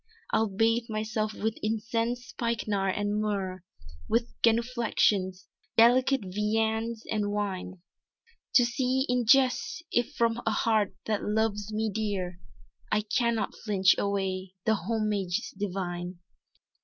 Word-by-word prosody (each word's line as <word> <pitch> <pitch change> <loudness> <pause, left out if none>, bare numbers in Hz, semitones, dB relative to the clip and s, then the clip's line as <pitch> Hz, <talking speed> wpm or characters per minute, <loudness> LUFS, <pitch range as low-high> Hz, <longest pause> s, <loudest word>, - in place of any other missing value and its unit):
"I'll 220 -1 +2
bathe 225 +4 +1
myself 215 0 -1
with 220 +1 -2
incense, 230 +3 -1
spikenard 215 -7 -1
and 205 +1 0
myrrh, 190 -4 -2 0.5
With 235 +1 +1
genuflexions, 225 -5 +2 0.3
delicate 255 +3 +5
viandes 220 +3 -1
and 210 -2 0
wine, 190 -3 -3 0.7
To 245 - +7
see, 260 +2 0
in 245 -2 +1
jest, 270 +6 +3
if 240 +5 0
from 230 0 +1
a - - +1
heart, 215 -2 +1
that 215 -2 -1
loves 210 -1 0
me 215 0 -1
dear, 190 -5 -2 0.5
I 210 - +3
cannot 230 +1 0
filch 195 -3 +3
away 190 -2 -2
the 220 - +4
hommages 205 -2 -1
divine." 180 -2 -4
215 Hz, 120 wpm, -28 LUFS, 200-230 Hz, 0.7 s, To